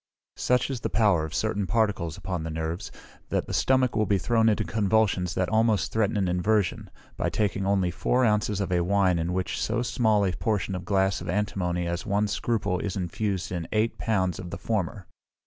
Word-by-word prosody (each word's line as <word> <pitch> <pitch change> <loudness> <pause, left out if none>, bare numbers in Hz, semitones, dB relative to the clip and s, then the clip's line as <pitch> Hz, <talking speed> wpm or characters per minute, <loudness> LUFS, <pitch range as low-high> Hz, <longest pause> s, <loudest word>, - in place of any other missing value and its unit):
Such 125 +2 +1
is 130 - -3
the - - -3
power 100 -8 +3
of 80 +2 -7
certain 105 -2 -1
particles 105 -7 0
upon 90 -3 -4
the 80 - -4
nerves, 80 +4 -4 0.4
that - - 0
the - - -6
stomach 130 -1 +2
will 110 0 +1
be 100 - +3
thrown 115 +3 +2
into 105 - +1
convulsions 100 -4 +1
that 90 - +1
almost 110 -1 +2
threaten 110 -1 +1
an 95 -2 +1
inversion, 90 +2 0 0.3
by - - 0
taking 100 -2 -1
only 95 -3 +2
four 125 +8 +1
ounces 105 -2 +1
of 95 -2 -2
a 90 -1 +2
wine 95 -2 +2
in 85 +2 -1
which 90 0 -2
so 120 - 0
small 110 -4 +2
a 95 - +1
portion 105 -1 -1
of 90 -1 -5
glass 95 0 +1
of - - -6
antimony 90 -3 -1
as 85 +1 -2
one 105 0 +1
scruple 105 -4 -1
is 100 - -3
infused 95 0 -2
in 85 -3 -3
eight 110 +1 0
pounds 95 -5 0
of 90 -2 -6
the - - -5
former. 100 -3 -2
100 Hz, 200 wpm, -26 LUFS, 90-110 Hz, 0.4 s, power